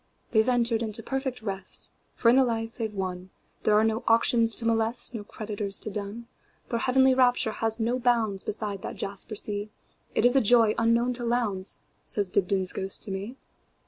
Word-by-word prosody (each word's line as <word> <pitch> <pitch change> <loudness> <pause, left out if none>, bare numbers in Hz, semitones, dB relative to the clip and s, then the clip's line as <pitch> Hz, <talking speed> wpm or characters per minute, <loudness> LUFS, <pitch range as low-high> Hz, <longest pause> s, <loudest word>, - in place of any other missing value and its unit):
"They 220 - +4
've 230 - -1
entered 235 -2 +2
into 225 0 -1
perfect 265 -3 -4
rest; 195 -3 -3 0.2
For 230 - +3
in 240 - +5
the 265 - +5
life 225 -2 -3
they 225 - -1
've 210 - -15
wonThere 185 +2 -4
are 210 +1 +4
no 225 +2 0
auctions 230 0 +4
to 230 - +4
molest, 225 +2 +1
No 220 -3 -5
creditors 205 -1 -5
to 215 - -4
dun. 205 +3 -6 0.4
Their 235 - -1
heavenly 265 +2 +3
rapture 250 -3 +2
has 225 +1 -1
no 235 +3 0
boundsBeside 215 -4 -1
that - - -6
jasper 200 +2 -4
sea; 205 0 -1 0.5
It - - +2
is 245 +2 +4
a 270 - +5
joy 225 -1 +4
unknown 235 +2 +2
to 240 0 -4
Lowndes,"Says 205 -3 -2
Dibdin's 190 0 +2
ghost 190 0 +2
to 205 - -1
me. 200 +6 -5
225 Hz, 180 wpm, -26 LUFS, 205-240 Hz, 0.5 s, in